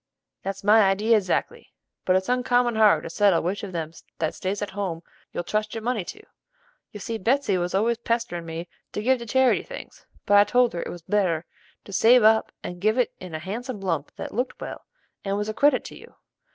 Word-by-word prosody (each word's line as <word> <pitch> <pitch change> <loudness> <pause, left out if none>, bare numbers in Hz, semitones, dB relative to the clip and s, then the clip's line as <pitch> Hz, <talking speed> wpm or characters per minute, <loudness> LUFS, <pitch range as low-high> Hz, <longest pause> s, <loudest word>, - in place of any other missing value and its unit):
"That's 195 0 -5
my 215 +2 +6
idee 210 +4 +2
exactly; 220 - 0 0.3
but 185 - +3
it's 190 0 +1
uncommon 245 -1 +2
hard 215 -1 +5
to - - -6
settle 200 -2 +3
which 185 +4 -2
of 200 - -6
them 160 -3 -4 0.3
that 160 -1 -1
stays 200 +2 -3
at 205 - -5
home 190 -4 -4 0.3
you'll - - -3
trust 215 +4 -2
your 225 - -5
money 240 -4 -1
to. - - -9 0.7
You 210 - -9
see 225 +2 -4
Betsey 240 0 +1
was 175 +1 -2
always 225 +4 +1
pesterin' 230 -8 -2
me 165 +1 -6 0.3
to 210 - -3
give 260 +2 +3
to 235 - -8
charity 260 +2 +3
things; - - -11 0.2
but 205 -1 +5
I - - +8
told 245 +2 +2
her 170 - -3
it - - -5
was 175 -2 -8
better 175 -5 0 0.4
to 200 - -11
save 235 +4 +6
up 220 +1 +4
and 175 0 -7
give 215 +3 +2
it 250 - +1
in 180 -3 -8
a - - -1
handsome 220 - -5
lump 165 -7 -3
that - - -7
looked 250 +4 -2
well, - - -8 0.4
and 195 0 -1
was 210 +1 -2
a - - -2
credit 290 +6 +3
to - - -10
you. - - -15
210 Hz, 220 wpm, -25 LUFS, 185-235 Hz, 0.7 s, I